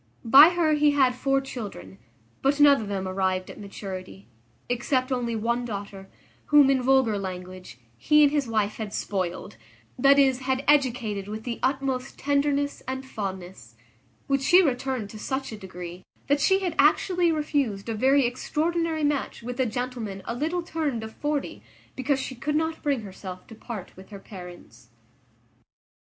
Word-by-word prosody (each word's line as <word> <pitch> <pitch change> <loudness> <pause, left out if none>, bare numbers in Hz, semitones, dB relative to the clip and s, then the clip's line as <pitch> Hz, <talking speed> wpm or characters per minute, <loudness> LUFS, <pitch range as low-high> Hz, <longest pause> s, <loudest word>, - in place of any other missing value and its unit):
By 275 +8 +9
her 325 -3 +2
he 295 -1 +3
had 265 -3 +3
four 270 +2 +1
children, 200 - -8 0.4
but 280 +2 +1
none 285 -3 +6
of 215 - -6
them 195 -2 -3
arrived 185 -1 -1
at - - -13
maturity, 185 - -8 0.4
except 255 +2 0
only 240 -2 -1
one 235 +2 -1
daughter, 200 -3 -7 0.4
whom, 290 -2 +6
in 265 -1 +2
vulgar 250 -5 +3
language, 185 -5 -7 0.2
he 300 - +5
and 285 - +5
his 290 -4 0
wife 215 -2 -1
had 215 -2 -5
spoiled; 185 - -3 0.4
that 275 0 +6
is, 265 -2 +4
had 260 0 -1
educated 240 -8 +1
with 215 +1 -6
the 235 -1 -4
utmost 265 -1 -1
tenderness 285 0 0
and 265 0 -4
fondness, 190 - -7 0.5
which 275 -1 0
she 360 +7 +6
returned 255 - -2
to 215 - -9
such 265 +3 -3
a - - -5
degree, 180 -3 -9 0.2
that 285 0 +1
she 385 +6 +3
had 360 -4 -1
actually 345 +4 +3
refused 280 -10 -1
a 225 - -2
very 265 +4 +3
extraordinary 320 +6 -1
match 290 -4 -1
with 245 +2 -6
a 260 - +2
gentleman 230 -4 -4
a - - -3
little 325 +8 -2
turned 300 -9 -2
of 220 0 -8
forty, 295 -1 -3 0.3
because 265 +1 0
she 265 - -4
could 285 +5 -3
not 320 +1 -1
bring 280 -5 0
herself 185 -2 -9
to 230 - -13
part 220 -3 -8
with 190 +1 -14
her 205 - -9
parents. 180 - -12
250 Hz, 165 wpm, -26 LUFS, 200-285 Hz, 0.5 s, By